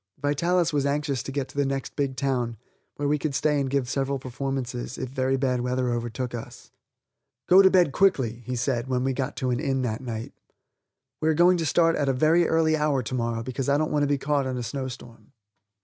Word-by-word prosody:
Vitalis 170 +4 +1
was 145 -2 +1
anxious 140 -2 -1
to 135 - -6
get 140 -1 -2
to - - -15
the 145 - +2
next 135 -1 -3
big 140 -2 -1
town, 125 -3 -1 0.4
where 145 - -2
we 150 +1 +1
could 145 -2 -2
stay 150 0 +2
and 135 - -2
give 135 -2 0
several 135 +1 -1
performances, 130 -1 -4
if 130 - -4
very 130 0 0
bad 130 -2 0
weather 125 0 0
overtook 120 +1 -3
us. 120 -2 -9 0.8
"Go 185 +2 +8
to 190 - +7
bed 180 -6 +4
quickly," 135 - +2
he 125 - -2
said, 120 0 -1
when 125 -1 0
we 135 0 0
got 135 +2 -3
to 130 -2 -1
an 120 - 0
inn 135 -3 0
that 110 -1 -2
night; 115 -3 -6 0.9
"we 155 - +2
are 160 - +2
going 175 +3 +5
to 165 -2 -1
start 165 +2 +3
at 140 -2 0
a - - +2
very 160 +6 +3
early 160 -1 +3
hour 150 -4 +1
to 115 - -6
morrow, 115 -2 -1
because 130 +2 -3
I 140 - +4
don't 155 +1 -1
want 150 - +1
to 145 - +2
be 145 0 +1
caught 140 0 0
in 130 -1 -3
a 125 - -3
snowstorm." 120 -2 -7
135 Hz, 225 wpm, -25 LUFS, 125-150 Hz, 0.9 s, Go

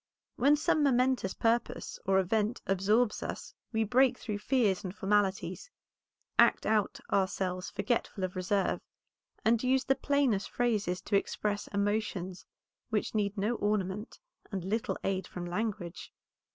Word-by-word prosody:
When 285 +3 +5
some 305 +1 +2
momentous 255 -7 +2
purpose 230 +1 0
or 195 0 +4
event 210 +5 +1
absorbs 210 +4 +2
us - - -6 0.2
we 220 -1 +1
break 250 +3 +3
through 210 -3 -4
fears 210 -4 +1
and 185 0 -5
formalities, 200 - 0 0.7
act - - +5
out 215 -2 +1
ourselves 185 -1 0
forgetful 230 -5 -1
of 185 0 -2
reserve, 185 +2 0 0.6
and 225 0 +4
use 260 +1 +3
the 270 - +3
plainest 270 -8 +1
phrases 210 -7 0
to 205 - -1
express 205 +1 -2
emotions 200 -3 -2 0.4
which 215 -2 -1
need 205 -1 0
no 210 +4 +1
ornament 205 0 -1 0.3
and 190 -3 -3
little 215 +4 -1
aid 190 -2 -1
from 175 -1 -6
language. 185 -1 -4
210 Hz, 135 wpm, -31 LUFS, 190-235 Hz, 0.7 s, When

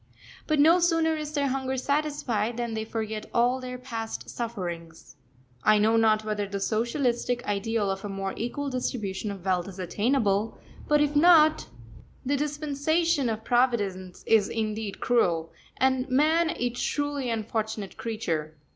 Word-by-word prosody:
But 310 - +2
no 330 +5 +6
sooner 330 -2 +2
is 305 -1 -5
their 285 -2 +1
hunger 265 0 -2
satisfied 260 -6 -1
than 235 -1 -2
they 220 0 -2
forget 220 -1 -4
all 245 +2 +3
their 250 0 -6
past 230 -3 -6
sufferings. 175 -10 -6 0.5
I 215 0 +5
know 220 +2 +3
not 220 -1 +3
whether 210 -1 -2
the 200 0 -4
socialistic 240 +3 0
ideal 205 0 0
of 195 0 -5
a 205 - -4
more 195 -1 -3
equal 275 +5 -3
distribution 215 -5 -3
of 195 -2 -7
wealth 185 -1 0
is 195 -1 -9
attainable, 205 +2 0 0.3
but 295 0 +4
if 295 0 +1
not, 310 0 +6 0.6
the 280 +3 +1
dispensation 295 0 0
of 220 0 -3
Providence 205 -7 0
is 220 -3 +4
indeed 215 -2 -3
cruel, 170 -9 +1 0.2
and 260 0 +1
man 315 +5 +3
a 245 -4 -1
truly 285 +1 -2
unfortunate 220 -2 -3
creature. 165 -9 -3
235 Hz, 145 wpm, -27 LUFS, 205-280 Hz, 0.6 s, no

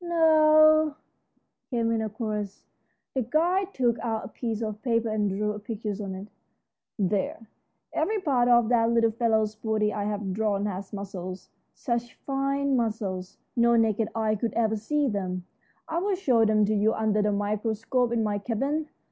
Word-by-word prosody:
"No," 310 -2 +5 0.7
came 230 -2 0
in 225 -1 0
a 220 - -2
chorus. 210 -2 -4 0.5
The 265 - 0
guide 350 - +1
took 240 -3 +1
out 225 -2 -2
a - - -8
piece 230 -2 -3
of 215 -1 -4
paper 230 -2 +1
and 210 -1 0
drew 210 +2 -1
a 210 - -6
picture 215 -1 -4
on 190 -1 -5
it. 195 +2 -8 0.7
"There, 205 +2 -1 0.5
every 430 0 0
part 265 -9 +2
of 240 -2 +5
that 230 -2 +3
little 230 -1 +3
fellow's 220 -2 +1
body 215 -1 -1
I've 205 -2 -2
drawn 205 -1 0
has 195 -1 -5
muscles, 190 -2 -7 0.3
such 240 -2 -3
fine 275 0 -1
muscles 205 -6 -2 0.2
no 235 -1 +4
naked 225 -1 +2
eye 220 -1 +1
could 225 +2 -2
ever 220 -1 +1
see 285 +7 0
them. 185 -5 -3 0.4
I'll 365 +5 0
show 250 - +3
them 215 -1 +3
to 215 - 0
you 215 +1 +2
under 215 -1 +1
the 210 0 +1
microscope 220 +4 -1
in 235 -1 +1
my 205 -1 -1
cabin. 275 +8 -2
225 Hz, 165 wpm, -27 LUFS, 210-250 Hz, 0.7 s, No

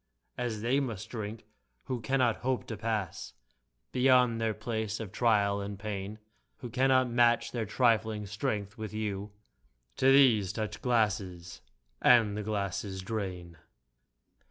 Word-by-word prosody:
As 115 -4 -3
they 130 +4 +2
must 115 -6 -4
drink, 110 -1 -6 0.4
who 125 -3 -4
cannot 120 0 +1
hope 130 0 -2
to 115 - -5
pass 105 -3 -3 0.6
Beyond 125 -3 +4
their 110 -1 0
place 110 -1 -3
of 110 -4 -6
trial 100 -3 +2
and 100 0 -5
of - - -16
pain. 100 0 -5 0.4
Who 120 - -8
cannot 130 0 +3
match 120 -1 +3
their 115 -4 -3
trifling 110 -2 +1
strength 100 +1 -3
with 110 -1 -6
you; 105 -1 -3 0.7
To 135 - +5
these, 115 -8 +5
touch 105 -1 -4
glasses 95 -7 -1 0.2
— - - -45
^and 115 -4 +6
the 105 - -3
glasses 100 -2 -3
drain 90 -5 -5
110 Hz, 140 wpm, -30 LUFS, 100-120 Hz, 0.7 s, ^and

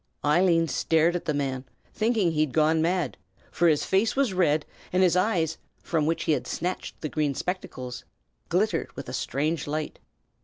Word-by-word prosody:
Eileen 165 +2 +4
stared 165 +2 +2
at 175 - -3
the 155 - 0
man, 135 -2 -2 0.3
thinking 215 -5 +1
he 155 - -2
had 155 -4 0
gone 160 +1 +3
mad; 170 -4 0 0.3
for 175 - +2
his 155 -3 +3
face 195 +4 +2
was 270 -7 +1
red, 155 -5 +2 0.3
and 185 +1 +3
his 180 -1 +4
eyes, 175 -5 +1 0.2
from 155 -3 0
which 165 - 0
he - - +1
had 150 - 0
snatched 180 +3 -4
the 155 - -2
green 150 -2 -1
spectacles, 130 -9 -5 0.5
glittered - - 0
with - - -7
a - - -6
strange 150 +3 -1
light. 155 +1 -3
160 Hz, 180 wpm, -26 LUFS, 150-180 Hz, 0.5 s, Eileen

